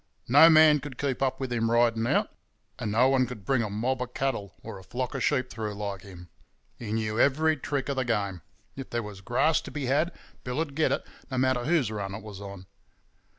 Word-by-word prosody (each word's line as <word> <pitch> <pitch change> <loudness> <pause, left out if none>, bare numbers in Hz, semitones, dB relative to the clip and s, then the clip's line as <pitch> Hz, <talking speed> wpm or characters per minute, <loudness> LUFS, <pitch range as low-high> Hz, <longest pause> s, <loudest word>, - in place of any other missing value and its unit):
No 145 +6 +8
man 155 -2 +7
could 140 -3 -9
keep 135 -3 -2
up 130 -1 0
with 130 -2 -3
him 115 -1 0
riding 115 -1 +2
out, - - +1 0.5
and 110 -4 -2
no 120 +4 +4
one 130 -2 +3
could 110 -6 -9
bring 130 +1 +2
a 110 - -2
mob 125 +5 -1
of 125 0 -5
cattle 105 -8 -2
or 110 -3 -8
a - - -14
flock 120 +6 -4
of 135 -3 -2
sheep 130 0 +1
through 110 -2 -4
like 100 -2 -4
him. 90 -3 -12 0.5
He 110 -3 -6
knew 110 0 -1
every 155 +3 +3
trick 140 -1 -3
of 140 -1 -2
the 130 - +1
game; 100 -7 -1 0.3
if 135 -1 -7
there 120 0 -2
was 105 -2 -9
grass 150 +10 +2
to - - -9
be 145 -3 -4
had 145 +7 +1 0.3
Bill'd 140 +4 -3
get 155 +2 +1
it, - - -1 0.2
no 130 - -3
matter 130 -1 +1
whose 145 -8 +2
run 100 -2 -4
it - - -8
was 100 -2 -9
on. 100 -2 -9
125 Hz, 225 wpm, -27 LUFS, 105-135 Hz, 0.5 s, No